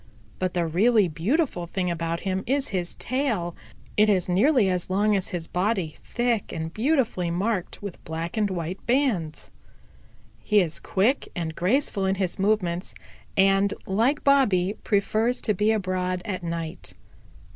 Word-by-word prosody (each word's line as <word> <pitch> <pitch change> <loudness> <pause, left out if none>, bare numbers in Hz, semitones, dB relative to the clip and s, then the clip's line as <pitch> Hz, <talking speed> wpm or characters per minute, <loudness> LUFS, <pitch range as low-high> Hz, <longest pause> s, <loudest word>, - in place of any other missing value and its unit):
But 185 -1 -1
the 175 -1 +1
really 205 +5 +3
beautiful 175 - 0
thing 180 0 -1
about 165 0 -2
him 190 0 -2
is 275 +2 0
his 180 -3 -2
tail. 225 -10 -1 0.4
It 210 0 +4
is 185 -4 +2
nearly 215 - +4
as 180 -1 -1
long 205 +3 +2
as 190 - -1
his 175 -2 -4
body, 180 -3 -1
thick 240 -3 -1
and 160 0 -4
beautifully 235 - +1
marked 190 +2 -2
with 200 -4 -7
black 165 +2 -4
and 210 -2 +1
white 180 0 -4
bands. 235 - 0 0.9
"He 210 -1 +3
is 160 -8 0
quick 220 - +1
and 165 -2 -3
graceful 195 - +1
in 190 - +1
his 190 -2 -2
movements, 190 -4 0 0.4
and, 195 +1 +4
like 230 +10 +1
Bobby, 210 -9 +3
prefers 220 +4 +1
to 215 - +2
be 210 +3 +2
abroad 185 -3 -1
at 190 -4 -3
night. 165 -2 -5
190 Hz, 150 wpm, -25 LUFS, 175-220 Hz, 0.9 s, It